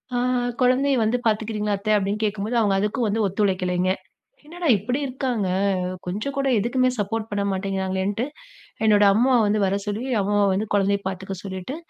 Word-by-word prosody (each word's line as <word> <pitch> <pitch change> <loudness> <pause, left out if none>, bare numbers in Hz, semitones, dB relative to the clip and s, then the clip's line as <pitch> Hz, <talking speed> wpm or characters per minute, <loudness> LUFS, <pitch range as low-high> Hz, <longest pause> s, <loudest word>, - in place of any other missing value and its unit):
அ - - +1 0.4
"குழந்தைய 260 +2 +3
வந்து 220 +3 +2
பாத்துக்குறீங்களா 215 -1 0
அத்த?" 215 +2 -5
அப்படின்னு 205 +2 -2
கேட்கும்போது, 215 +2 -1
அவுங்க 200 -3 +2
அதுக்கும் 210 +4 0
வந்து 220 +2 0
ஒத்துழைக்கலைங்க. 185 -2 0 0.5
என்னடா 340 +1 -5
இப்படி 245 +8 -2
இருக்காங்க! 250 -6 -2 0.6
கொஞ்சம் 210 +10 -3
கூட 275 0 +1
எதுக்குமே 255 +4 +1
சப்போர்ட் 220 +2 -2
பண்ண 200 -1 -1
மாட்டேங்கிறாங்களேன்னுட்டு, 190 +3 -2 0.6
என்னோட 210 -1 +5
அம்மா 250 +5 +3
வந்து 210 +1 +1
வர 195 +1 +1
சொல்லி, 210 +4 -2 0.2
அம்மா 205 +1 0 0.2
வந்து 205 +3 -1
குழந்தைய 200 0 +2
பாத்துக்க 190 0 -5
சொல்லிட்டு, 190 +8 -6
210 Hz, 150 wpm, -23 LUFS, 195-240 Hz, 0.6 s, என்னோட